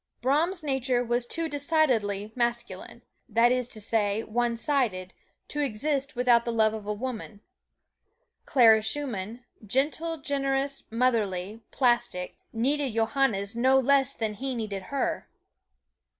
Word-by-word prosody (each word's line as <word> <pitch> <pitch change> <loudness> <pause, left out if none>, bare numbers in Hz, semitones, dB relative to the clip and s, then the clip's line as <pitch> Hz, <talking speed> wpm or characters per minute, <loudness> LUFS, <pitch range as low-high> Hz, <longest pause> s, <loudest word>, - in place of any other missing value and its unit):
Brahms' 320 +7 +1
nature 265 -3 0
was 240 0 -1
too 330 +4 -2
decidedly 255 -10 +1
masculine, 235 0 -3 0.3
that 230 +2 +4
is 250 -1 0
to 225 - -5
say, 215 0 0
one 235 +1 -1
sided, 230 -10 -1 0.4
to 295 - -2
exist 280 +3 -1
without 240 -1 +4
the 235 - -2
love 220 -1 +2
of 215 -2 -6
woman; 210 -1 -5 1.1
Clara 225 -4 +6
Schumann, 235 -3 -2 0.2
gentle, 295 +9 0
generous, 275 -1 -1
motherly, 220 -4 0
plastic, 240 -8 0 0.2
needed 265 +2 0
Johannes 225 -2 0
no 260 +3 +4
less 275 +1 +3
than 220 -2 -2
he 260 +5 -4
needed 205 -5 -4
her. 280 -1 -2
240 Hz, 120 wpm, -27 LUFS, 220-275 Hz, 1.1 s, Clara